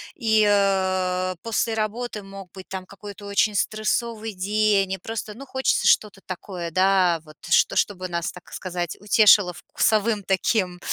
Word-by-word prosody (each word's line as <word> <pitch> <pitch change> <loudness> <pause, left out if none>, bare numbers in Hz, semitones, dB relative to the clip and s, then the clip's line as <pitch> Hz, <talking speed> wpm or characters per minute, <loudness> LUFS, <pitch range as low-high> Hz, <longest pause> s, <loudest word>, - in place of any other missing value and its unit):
И, 220 -3 +2
э-э, 185 -2 +1
после 225 0 -1
работы 220 0 -3
мог 195 -2 -11
быть 190 -1 -11
там 190 -1 -6
какой-то 200 +1 -11
очень 200 +1 +1
стрессовый 220 +2 -1
день. 200 0 +1
И - - -3
просто, 215 +2 -6
ну, 275 +4 -10
хочется 265 0 0
что-то 205 -2 +2
такое, 180 -2 -6
да, 185 -1 +3
вот, 155 0 -16
что - - +3
что 205 - +2
бы 185 0 -6
нас, 170 0 -2
так 180 - -15
сказать, 175 -3 -4
утешило 205 -2 +5
вкусовым 215 +3 0
таким, 185 -1 0
200 Hz, 155 wpm, -23 LUFS, 185-215 Hz, -, утешило